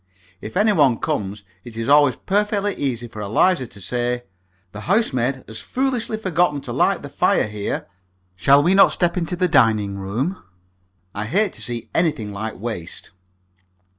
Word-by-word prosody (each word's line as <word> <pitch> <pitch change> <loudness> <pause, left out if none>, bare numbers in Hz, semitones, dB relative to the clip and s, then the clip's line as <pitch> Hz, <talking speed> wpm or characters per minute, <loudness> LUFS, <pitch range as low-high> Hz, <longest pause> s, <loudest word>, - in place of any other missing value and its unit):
If 110 - -6
any 210 +1 +4
one 140 -9 +4
comes, 100 -1 -3 0.2
it 115 -2 -10
is 115 0 -3
always 145 -3 +5
perfectly 205 0 0
easy 120 -4 -3
for 110 -2 -9
Eliza 125 - +2
to 100 - -15
say, 120 +4 -2 0.5
"The 105 - -8
housemaid 135 - +1
has 110 -1 -7
foolishly 250 - -2
forgotten 175 -7 +1
to - - -6
light - - +1
the - - -6
fire - - +2
here. 105 -1 -4 0.5
Shall 140 +9 +5
we 175 +4 +3
not 195 0 +6
step 175 -2 +1
into 180 0 -2
the 180 +1 +1
dining 110 - +2
room?" 120 - -3 0.7
I 105 +1 -4
hate 195 - +1
to - - -9
see 115 +1 -5
anything 130 -12 0
like 110 +2 -5
waste. 105 -6 -6
130 Hz, 165 wpm, -21 LUFS, 110-180 Hz, 0.7 s, not